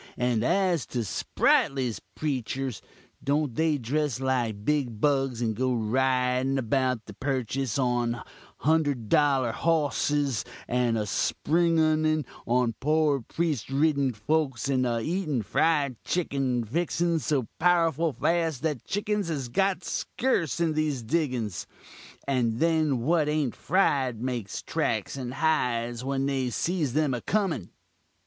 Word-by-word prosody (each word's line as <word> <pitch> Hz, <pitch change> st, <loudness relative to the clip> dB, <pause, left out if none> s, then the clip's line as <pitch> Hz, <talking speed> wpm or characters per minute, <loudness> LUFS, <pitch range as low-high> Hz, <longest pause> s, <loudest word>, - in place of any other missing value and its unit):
And 125 Hz, -3 st, +1 dB
as 180 Hz, 0 st, +1 dB
to 120 Hz, -2 st, -2 dB
Sprightly's 125 Hz, +3 st, +1 dB
preachurs, 135 Hz, -4 st, -3 dB, 0.4 s
don't 145 Hz, -2 st, 0 dB
they 160 Hz, +3 st, +1 dB
dress 140 Hz, +1 st, -1 dB
like 120 Hz, -6 st, -1 dB
big 135 Hz, -8 st, 0 dB
bugs, 135 Hz, -3 st, +1 dB
and 110 Hz, -2 st, 0 dB
go 130 Hz, +3 st, 0 dB
ridin 125 Hz, +3 st, +1 dB
about 130 Hz, -1 st, 0 dB
the 105 Hz, -, -10 dB
Purchis 130 Hz, 0 st, -2 dB
on 120 Hz, -2 st, 0 dB, 0.4 s
hunder 155 Hz, -1 st, +3 dB
dollur 130 Hz, +1 st, +2 dB
hossis, 145 Hz, -5 st, +1 dB, 0.2 s
a 120 Hz, -3 st, +1 dB
spunginin 155 Hz, -, +2 dB, 0.2 s
on 120 Hz, -1 st, +2 dB
poor 150 Hz, -1 st, +2 dB
priest 155 Hz, 0 st, -2 dB
riden 140 Hz, -1 st, +2 dB
folks 135 Hz, +3 st, 0 dB
and 130 Hz, -2 st, +2 dB
a 115 Hz, -1 st, 0 dB
eatin 155 Hz, -, -1 dB
fried 145 Hz, 0 st, +1 dB
chickin 135 Hz, -8 st, 0 dB
fixins 165 Hz, +5 st, 0 dB
so 130 Hz, -2 st, 0 dB
powerful 165 Hz, -2 st, +3 dB
fast 165 Hz, -2 st, 0 dB
that 150 Hz, -6 st, -1 dB
chickins 205 Hz, -1 st, -1 dB
has 140 Hz, -7 st, -3 dB
got 190 Hz, +5 st, +1 dB
skerse 175 Hz, -, -1 dB
in 165 Hz, -2 st, +1 dB
these 150 Hz, -5 st, -1 dB
diggins; 125 Hz, -, -1 dB, 0.6 s
and 120 Hz, -4 st, +1 dB
then 155 Hz, -5 st, +2 dB
what 155 Hz, +3 st, +2 dB
ain't 150 Hz, -5 st, 0 dB
fried 135 Hz, -, +1 dB
makes 120 Hz, -5 st, -4 dB
tracks -, -, -1 dB
and 130 Hz, -1 st, -5 dB
hides 125 Hz, -6 st, 0 dB
when 135 Hz, 0 st, -1 dB
they 135 Hz, -2 st, 0 dB
sees 155 Hz, 0 st, -1 dB
them 150 Hz, -2 st, +1 dB
a 120 Hz, -, -3 dB
comin? 185 Hz, -, -1 dB
135 Hz, 125 wpm, -27 LUFS, 125-155 Hz, 0.6 s, hunder